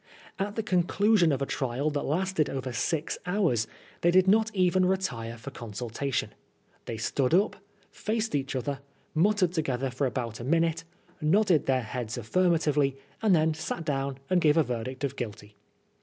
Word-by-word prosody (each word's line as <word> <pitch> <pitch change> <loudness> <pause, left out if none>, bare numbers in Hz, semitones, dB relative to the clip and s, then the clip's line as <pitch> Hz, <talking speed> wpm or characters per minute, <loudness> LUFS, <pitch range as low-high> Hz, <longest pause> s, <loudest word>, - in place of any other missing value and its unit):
At 200 +1 -2
the 225 - -1
conclusion 185 0 +3
of 140 -1 0
a - - 0
trial 135 +3 -1
that 145 -1 -1
lasted 175 0 0
over 130 -2 -4
six 155 +6 -1
hours 175 - +1 0.3
they 175 - +4
did 185 +2 +5
not 220 +3 +4
even 185 0 +3
retire 120 -12 -2
for 130 +4 -8
consultation. 120 +3 -3 0.5
They 115 - -4
stood 130 +5 +1
up, 195 +3 +2 0.3
faced 220 -1 -2
each 140 -1 -1
other, 135 +2 -2 0.3
muttered 185 +2 +3
together 135 -6 -1
for 135 +2 0
about 115 -2 -4
a - - -6
minute, 165 +4 +1 0.4
nodded 175 0 +3
their 130 -2 +2
heads 120 +1 -4
affirmatively, 150 - +2 0.2
and 210 -5 +4
then 160 0 +3
sat 160 +1 -4
down 135 -2 -1
and 185 -1 +2
gave 150 0 +4
a 160 - +6
verdict 125 +1 -4
of 140 -1 -1
guilty. 105 -4 -7
150 Hz, 165 wpm, -28 LUFS, 130-180 Hz, 0.5 s, a